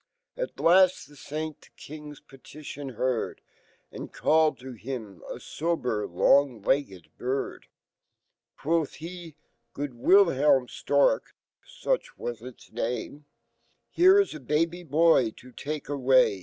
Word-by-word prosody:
At - - -5
laity 180 -4 +4
e - - -16
Saint 155 +2 -5
y - - -17
e - - -26
King's 150 -1 -10
petit 140 +2 -11
ion 140 -1 -6
heard, 125 0 -1 0.5
And - - -8
called 155 0 +2
to 130 +1 -8
him 110 -5 -7
a - - -5
fber 125 - -2
long 125 +4 +3
legged 100 - -1
bird. 130 +2 -3 0.9
Qyofh 160 0 0 0.8
he^Good 145 +1 -3
WiihelmStorkOuchwau 170 - +1
its 130 - -14
name), 120 +5 -4 0.7
Here 375 +2 +6
1$ 400 - +1
a - - -7
baby 165 +6 0
boy 160 -5 +3
to 125 - -14
take 150 +4 -5
away. 130 -7 +3
145 Hz, 115 wpm, -27 LUFS, 125-160 Hz, 0.9 s, Here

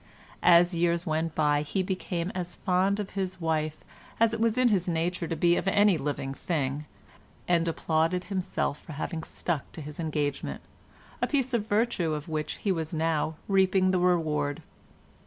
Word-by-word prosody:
As 175 +1 +6
years 170 0 +1
went 160 0 -1
by 145 -1 +3
he 150 +6 -1
became 180 -1 -2
as 180 -1 -5
fond 190 +2 +1
of 205 -2 -4
his 185 -2 -3
wife 155 -2 -1 0.4
as 225 0 +4
it 225 - -2
was 230 +1 +2
in 255 -1 +4
his 190 -5 +1
nature 170 0 -1
to 165 - -2
be 170 +2 +3
of - - -2
any 205 -1 +5
living 140 -3 -3
thing, 145 -2 -2 0.6
and 170 -1 +3
applauded 165 +2 +1
himself 185 -6 -2
for 160 - -9
having 160 +3 -4
stuck 160 -1 -3
to - - -7
his 150 +1 -8
engagement—a 150 -3 -4
piece 265 -3 0
of 220 -3 0
virtue 205 -7 +1
of 150 +1 -6
which 155 -1 -2
he 200 - -1
was 165 -2 -2
now 160 0 0
reaping 190 -1 +3
the 185 - +2
reward. 155 -5 +1
170 Hz, 170 wpm, -28 LUFS, 155-190 Hz, 0.6 s, As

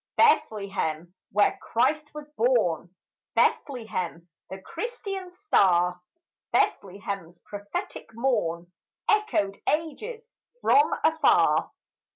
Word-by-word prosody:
Bethlehem, 180 -5 +1 0.2
where 205 +1 +2
Christ 295 +6 0
was 300 -1 -7
born, 190 -8 +1 0.4
Bethlehem, 185 - 0 0.2
the 190 - -7
Christian's 390 - -6
star! 180 - +3 0.5
Bethlehem's 190 -3 -1
prophetic 205 0 -6
morn 175 -9 -1 0.4
Echoed 415 - +1
ages 430 - -3 0.3
from 445 -1 +4
afar. 320 0 +4
210 Hz, 80 wpm, -26 LUFS, -, 0.5 s, from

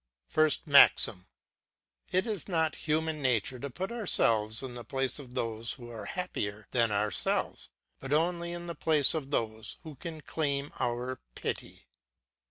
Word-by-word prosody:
FIRST 155 +1 +3
MAXIM. 140 - +6 0.8
It 185 +1 +2
is 210 -8 -2
not 160 -4 +1
in - - -11
human 155 0 0
nature 125 -1 +1
to 140 - -5
put 185 - -4
ourselves 115 - +3
in 130 -2 -5
the 120 -1 -7
place 135 +3 -1
of 130 -3 -11
those 115 -2 -1
who 120 -2 -10
are 110 -3 -7
happier 105 - -4
than 115 -2 +3
ourselves, 105 +1 0 0.3
but 135 - -7
only 170 +3 +1
in 175 0 -5
the 170 - -4
place 155 -4 +2
of 150 -4 -3
those 110 -5 -2
who 155 - -8
can 160 +3 -8
claim 145 -2 -2
our 125 +1 -2 0.2
pity. - - -5
140 Hz, 160 wpm, -30 LUFS, 115-160 Hz, 0.8 s, MAXIM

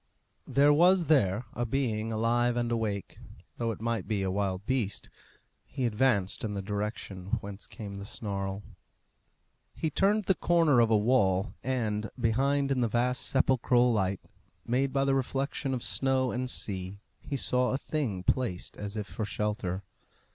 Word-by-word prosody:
There 145 +1 +5
was 175 +1 +4
there 115 -6 +3
a 120 - -2
being 115 -3 -1
alive 120 +2 +1
and 120 -1 0
awake, 105 -4 -2 0.4
though 115 -1 -1
it 115 - -4
might 115 0 -2
be 105 -3 0
a 95 - 0
wild 95 -1 -1
beast. 120 -6 -1 0.5
He 130 -2 -3
advanced 105 -4 +1
in 105 -2 -2
the 100 - -2
direction 100 -2 -3
whence 100 0 -8
came 100 -2 -8
the 100 0 -7
snarl. 100 -2 -4 1.1
He 160 - -2
turned 205 +6 +2
the 190 - +4
corner 165 -7 +3
of 115 -1 +4
a 110 - +5
wall, 105 -3 +2
and, 110 -5 -1
behind 135 +4 +1
in 130 -2 +1
the 120 - +3
vast 125 +3 0
sepulchral 125 -2 +3
light 95 -3 0 0.4
made 130 +3 +1
by 135 0 +1
the 135 - +2
reflection 135 +1 -1
of 125 -2 -2
snow 130 -1 +1
and 125 +1 -2
sea, 95 -4 -1 0.2
he 140 - -4
saw 125 -1 +1
a 130 - 0
thing 130 -12 -3
placed 110 -5 -1
as 105 +1 -5
if 105 - -2
for 110 - -5
shelter. 105 -3 -2
115 Hz, 160 wpm, -29 LUFS, 100-130 Hz, 1.1 s, There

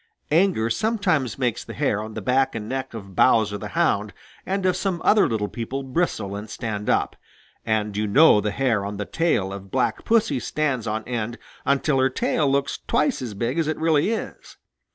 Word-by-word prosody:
Anger 160 - +3
sometimes 180 - 0
makes 125 -4 -1
the - - -9
hair 100 - 0
on 110 0 -8
the - - -5
back 130 +1 +2
and 105 -2 -5
neck 130 0 -4
of 100 -4 -9
Bowser 105 -3 +3
the 105 - -5
Hound 105 -12 +1 0.3
and 195 0 -1
of 185 - +3
some 190 -3 -1
other 210 -7 +5
little 110 -3 -1
people 125 +5 -5
bristle 130 - -1
and 105 +1 -7
stand 105 -2 -4
up, - - +1 0.5
and 105 -2 0
you 105 +1 0
know 135 0 +6
the 105 - -1
hair 115 -3 0
on 100 0 -5
the 105 - -3
tail 100 - 0
of 100 0 -9
Black 130 +3 0
Pussy 220 - +2
stands 130 -4 -1
on 110 +1 -2
end 120 -1 -3 0.3
until 140 0 +2
her 130 0 +3
tail 140 +2 0
looks 140 0 0
twice 255 - +1
as 115 -5 -5
big 120 +9 -1
as 160 - +1
it 155 - -1
really 160 +2 +2
is. 225 - -5
125 Hz, 195 wpm, -23 LUFS, 105-155 Hz, 0.5 s, know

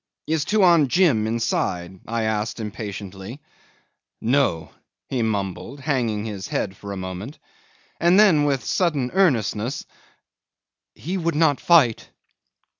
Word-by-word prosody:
"Is 155 -1 0
Tuan 175 -8 +4
Jim 135 - +3
inside?" 95 -5 -2
I 115 0 -1
asked 110 +1 -2
impatiently. 100 +1 -7 0.8
"No," 120 - +1 0.4
he 130 -3 -1
mumbled, 105 +5 -3
hanging 120 -7 -1
his 100 -4 -5
head 95 -1 -2
for 100 +1 -9
a 100 - -5
moment, 95 - -6 0.6
and 175 +3 +4
then 170 -9 +5
with 135 -4 0
sudden 150 -9 0
earnestness, 125 - +1 1.1
"He 185 +6 -4
would 170 -2 -1
not 150 -3 +2
fight. 145 -10 +4
120 Hz, 115 wpm, -23 LUFS, 105-155 Hz, 1.1 s, then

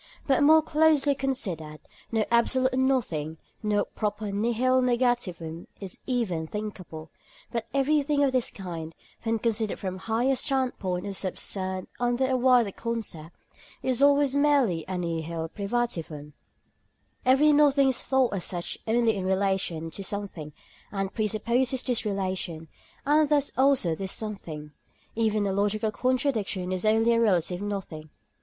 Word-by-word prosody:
But 270 -1 +2
more 310 +2 +6
closely 305 -2 +3
considered, 195 - -3 0.3
no 220 -2 +1
absolute 255 +2 +3
nothing, 230 - 0 0.2
no 210 -1 +1
proper 210 -1 -3
nihil 240 +5 +2
negativum 240 -10 -1
is 195 -3 -7
even 200 -11 -1
thinkable; 185 -6 -7 0.4
but 230 -2 -3
everything 285 +1 +2
of 275 - +3
this 255 -2 +1
kind, 165 -4 -7 0.3
when 225 0 0
considered 220 -2 -1
from 185 -2 -4
a - - -11
higher 230 +6 +1
standpoint 245 -9 -1
or 200 - -4
subsumed 185 0 -3
under 245 +2 +1
a 260 0 +1
wider 250 -4 +4
concept, 210 -9 -5 0.5
is 255 0 0
always 285 -1 +4
merely 280 - +3
a 185 -1 -3
nihil 165 -1 -3
privativum. 170 -9 -3 0.9
Every 270 +4 +5
nothing 285 -2 +5
is 260 - -2
thought 265 -4 +2
as 190 -3 -2
such 175 -2 -2
only 225 -1 +2
in 195 - -3
relation 190 -4 0
to 195 - -6
something, 190 -6 -4 0.4
and 195 -1 -3
presupposes 235 +4 0
this 245 -4 -1
relation, 185 -5 -3 0.4
and 300 +1 +4
thus 290 -2 +2
also 265 -10 +3
this 190 +3 -4
something. 165 -9 -5 0.4
Even 215 -2 +1
a 195 - 0
logical 210 +2 0
contradiction 230 -7 -1
is 185 +2 -2
only 225 +2 +4
a 230 - +3
relative 180 -4 +1
nothing. 190 -7 -5
215 Hz, 140 wpm, -27 LUFS, 185-255 Hz, 0.9 s, more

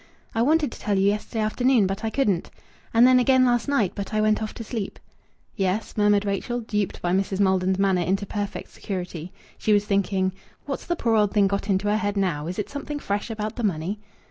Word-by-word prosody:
"I 225 - +1
wanted 300 +1 +3
to - - -10
tell 205 -3 0
you 190 - +3
yesterday 210 +2 0
afternoon, 245 +1 +3
but 195 +3 -3
I 225 - 0
couldn't. 210 -9 0 0.4
And 230 +2 +6
then 255 0 +6
again 260 +1 +4
last 240 0 +2
night, 255 -10 +2
but 200 +1 -5
I - - +2
went 215 0 +2
off 215 - -3
to 230 - -6
sleep." 220 -3 -4 0.6
"Yes?" 195 +1 -1
murmured 205 -1 +3
Rachel, 205 +5 -2
duped 210 -4 -2
by 175 - +1
Mrs. 190 +1 0
Maldon's 190 -1 +2
manner 190 -2 +2
into 195 +3 0
perfect 205 0 -5
security. 180 -3 -5 0.3
She 215 - +2
was 205 0 +3
thinking: 195 -2 +1 0.3
"What's 275 -2 -5
the 345 - 0
poor 230 -8 0
old 210 -2 +2
thing 205 -2 +4
got 200 +1 -1
into 195 +1 +1
her 210 +1 +2
head 205 -2 -1
now? 165 -6 0
Is 180 - -4
it 210 - -2
something 290 +1 -5
fresh 205 -5 -3
about 215 -1 -4
the 240 - -3
money?" 190 +1 -1
205 Hz, 220 wpm, -24 LUFS, 195-225 Hz, 0.6 s, And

